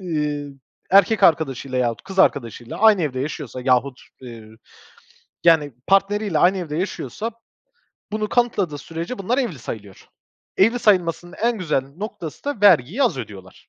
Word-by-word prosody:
iii, 150 Hz, -5 st, -3 dB, 0.4 s
erkek 200 Hz, +3 st, +4 dB
arkadaşıyla 135 Hz, -5 st, +2 dB
yahut 120 Hz, -2 st, -1 dB
kız 190 Hz, 0 st, -9 dB
arkadaşıyla 120 Hz, -, +1 dB
aynı 215 Hz, -4 st, +5 dB
evde 130 Hz, -4 st, -2 dB
yaşıyorsa 140 Hz, -3 st, -5 dB
yahut, 130 Hz, 0 st, +1 dB, 0.2 s
eee, 125 Hz, -2 st, -10 dB
ü 110 Hz, 0 st, -15 dB, 0.9 s
yani 160 Hz, -5 st, +4 dB
partneriyle 195 Hz, -2 st, +2 dB
aynı 180 Hz, +4 st, +4 dB
evde 165 Hz, -5 st, -5 dB
yaşıyorsa 210 Hz, +4 st, -4 dB, 0.8 s
bunu 215 Hz, 0 st, -2 dB
kanıtladığı 200 Hz, -11 st, 0 dB
sürece 165 Hz, -, -6 dB
bunlar 230 Hz, +7 st, -1 dB
evli 230 Hz, -, -2 dB
sayılıyor. 105 Hz, -5 st, -9 dB, 0.5 s
Evli 230 Hz, +5 st, +3 dB
sayılmasının 175 Hz, -5 st, +1 dB
en 235 Hz, -1 st, +1 dB
güzel 150 Hz, -7 st, 0 dB
noktası 175 Hz, -6 st, -7 dB
da 285 Hz, -7 st, -3 dB
vergiyi 195 Hz, -, +4 dB
az 235 Hz, -, +1 dB
ödüyorlar, 100 Hz, -6 st, -10 dB
165 Hz, 140 wpm, -21 LUFS, 135-205 Hz, 0.9 s, aynı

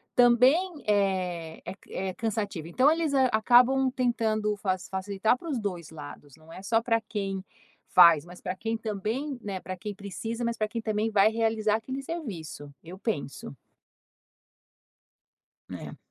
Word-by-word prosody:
também, 265 Hz, +8 st, +4 dB
eh, 185 Hz, -5 st, 0 dB
é -, -, -5 dB
ca 195 Hz, -, -23 dB
é 190 Hz, 0 st, -3 dB
cansativo. 205 Hz, -6 st, -3 dB
Então 255 Hz, -, +4 dB
eles, 320 Hz, -2 st, 0 dB
hã, 265 Hz, -2 st, +4 dB
acabam 250 Hz, +4 st, +5 dB
tentando 225 Hz, -4 st, 0 dB
faci 185 Hz, -2 st, -2 dB
facilitar 200 Hz, +4 st, 0 dB
para 335 Hz, -, -11 dB
os 275 Hz, -, -1 dB
2 180 Hz, -7 st, -4 dB
lados, 145 Hz, -2 st, -10 dB
não 160 Hz, +1 st, -17 dB
é 185 Hz, -, -9 dB
só 225 Hz, +3 st, +1 dB
para 230 Hz, -1 st, +2 dB
quem 195 Hz, -3 st, -3 dB, 0.5 s
faz, 170 Hz, -4 st, +7 dB
mas 180 Hz, +1 st, -13 dB
para 185 Hz, -1 st, -3 dB
quem 225 Hz, +3 st, -2 dB
também, 225 Hz, +6 st, -3 dB
né, 195 Hz, -3 st, -5 dB
para 185 Hz, 0 st, -6 dB
quem 205 Hz, +3 st, -6 dB
precisa, 225 Hz, +4 st, -5 dB
mas 235 Hz, 0 st, -1 dB
para 215 Hz, -1 st, 0 dB
quem 230 Hz, +2 st, -4 dB
também 215 Hz, 0 st, 0 dB
vai 205 Hz, -1 st, +5 dB
realizar 220 Hz, -1 st, +1 dB
aquele 260 Hz, +5 st, -5 dB
serviço, 195 Hz, -, -6 dB
eu 180 Hz, +3 st, -10 dB
penso. 145 Hz, -, -4 dB, 2.2 s
É. -, -, -7 dB
215 Hz, 155 wpm, -28 LUFS, 185-240 Hz, 2.2 s, faz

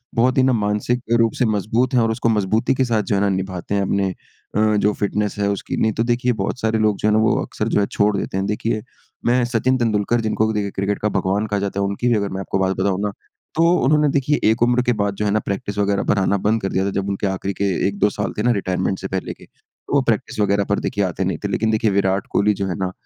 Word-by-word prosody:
बहुत 125 Hz, +3 st, +2 dB
ही 130 Hz, -, +5 dB
ना 130 Hz, 0 st, +3 dB
मानसिक 105 Hz, +3 st, 0 dB, 0.2 s
रूप 115 Hz, -1 st, +3 dB
से 125 Hz, -, +3 dB
मज़बूत 110 Hz, +4 st, 0 dB
हैं 125 Hz, -, +4 dB
और 115 Hz, 0 st, +1 dB
उसको 115 Hz, +1 st, 0 dB
मज़बूती 110 Hz, +3 st, +1 dB
के 130 Hz, -, +1 dB
साथ 115 Hz, -3 st, +1 dB
जो 100 Hz, -, -1 dB
है 100 Hz, -, +1 dB
ना 100 Hz, -, +2 dB
निभाते 95 Hz, 0 st, -3 dB
हैं 100 Hz, -, +1 dB
अपने 100 Hz, 0 st, 0 dB, 0.5 s
अ 110 Hz, 0 st, +3 dB
जो 105 Hz, +1 st, +2 dB
फ़िटनेस 105 Hz, 0 st, -1 dB
है 100 Hz, -, +1 dB
उसकी। 100 Hz, -, -3 dB
नहीं 110 Hz, -, +2 dB
तो 115 Hz, -, 0 dB
देखिए 120 Hz, +1 st, +1 dB
बहुत 120 Hz, -, -3 dB
सारे 110 Hz, -1 st, 0 dB
लोग 105 Hz, -2 st, +2 dB
जो -, -, 0 dB
है 105 Hz, -, +3 dB
ना 110 Hz, -, +4 dB
वो 110 Hz, -, +3 dB
अक्सर -, -, -3 dB
जो -, -, +2 dB
है 100 Hz, -, +2 dB
छोड़ 105 Hz, 0 st, +2 dB
देते 95 Hz, -, -3 dB
हैं। 95 Hz, -, 0 dB
देखिए 105 Hz, +1 st, -1 dB, 0.4 s
मैं 125 Hz, +1 st, +3 dB
सचिन 125 Hz, +2 st, +1 dB
तेंदुलकर 115 Hz, 0 st, +1 dB
जिनको 110 Hz, 0 st, 0 dB
देखिए 100 Hz, -2 st, -2 dB
क्रिकेट 100 Hz, +2 st, -2 dB
का 105 Hz, -, 0 dB
भगवान 100 Hz, +1 st, 0 dB
कहा 105 Hz, -1 st, -1 dB
जाता 100 Hz, 0 st, -3 dB
है 100 Hz, -, +1 dB
उनकी 100 Hz, +5 st, -2 dB
भी 120 Hz, -, +3 dB
अगर 100 Hz, -1 st, -1 dB
मैं 95 Hz, -, -4 dB
आपको 95 Hz, 0 st, -2 dB
बात 95 Hz, 0 st, +1 dB
बताऊँ 95 Hz, 0 st, 0 dB
ना 105 Hz, 0 st, -1 dB, 0.4 s
तो 165 Hz, -, +3 dB, 0.2 s
उन्होंने 150 Hz, +3 st, +3 dB
देखिए 145 Hz, +2 st, +1 dB
एक 110 Hz, +1 st, +1 dB
उम्र 120 Hz, +1 st, +3 dB
के 125 Hz, -, +2 dB
बाद 100 Hz, -2 st, -1 dB
जो 105 Hz, -, -2 dB
है 105 Hz, -, +1 dB
ना 110 Hz, -, +2 dB
प्रैक्टिस 100 Hz, +1 st, -4 dB
वग़ैरह 100 Hz, -1 st, +1 dB
पर -, -, +3 dB
आना 100 Hz, +1 st, +2 dB
बंद 110 Hz, +3 st, 0 dB
कर 95 Hz, -, -2 dB
दिया 95 Hz, -, +1 dB
था -, -, 0 dB
जब 100 Hz, 0 st, -1 dB
उनके 100 Hz, +1 st, -1 dB
आख़िरी 95 Hz, +1 st, -2 dB
के -, -, +3 dB, 0.2 s
1-2 100 Hz, +1 st, +1 dB
साल 100 Hz, 0 st, -3 dB
थे 105 Hz, -, -1 dB
ना 120 Hz, -, +3 dB
रिटायरमेंट 95 Hz, -2 st, -1 dB
से 95 Hz, -, -4 dB
पहले 95 Hz, -1 st, -3 dB
के, -, -, -17 dB, 0.5 s
वो 140 Hz, -, +4 dB
प्रैक्टिस 120 Hz, -2 st, -1 dB
वगैरह 100 Hz, -1 st, +2 dB
पर 100 Hz, -, +1 dB
देखिए 100 Hz, -, -1 dB
आते 95 Hz, 0 st, -2 dB
नहीं 90 Hz, -3 st, -1 dB
थे। -, -, 0 dB
लेकिन 110 Hz, +2 st, +1 dB
देखिए 110 Hz, -1 st, +1 dB
विराट 95 Hz, 0 st, +1 dB
कोहली 105 Hz, +1 st, +3 dB
जो 100 Hz, -1 st, -3 dB
है 90 Hz, -, -2 dB
ना 95 Hz, -1 st, -1 dB
105 Hz, 275 wpm, -20 LUFS, 100-115 Hz, 0.5 s, ही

